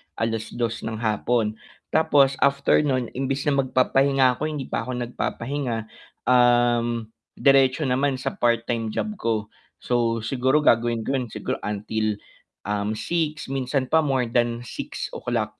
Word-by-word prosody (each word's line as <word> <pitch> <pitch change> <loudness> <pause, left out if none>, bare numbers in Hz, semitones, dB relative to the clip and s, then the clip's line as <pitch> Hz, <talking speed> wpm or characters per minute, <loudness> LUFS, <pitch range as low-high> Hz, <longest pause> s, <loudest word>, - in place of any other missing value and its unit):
2:00 115 +1 -2
ng 110 - -3
hapon. 110 0 0 0.3
Tapos 140 -4 +3
after 140 0 +3
non, 130 -5 0
imbis 135 +1 -2
na 140 -2 +1
magpapahinga 130 0 +3
ko, 155 - -1
hindi 150 -4 -5
pa - - -2
ako 125 -1 -2
nagpapahinga, 120 0 -3 0.5
um, 120 -2 +3 0.2
diretso 135 +1 +4
naman 135 +1 +1
sa 130 - -3
part-time 115 -1 +1
job 160 - -2
ko. 110 -2 -1 0.3
So 115 -2 0
siguro 130 +5 +1
gagawin 115 -2 +3
ko 135 - -2
yun, 125 - -4
siguro - - -4
until, 105 +1 -2 0.5
um, 105 +1 -2
6, 155 0 -2
minsan 130 0 -1
pa 160 - +5
more 135 -6 0
than 120 0 +1
6:00 - - -4
125 Hz, 135 wpm, -24 LUFS, 115-135 Hz, 0.5 s, pa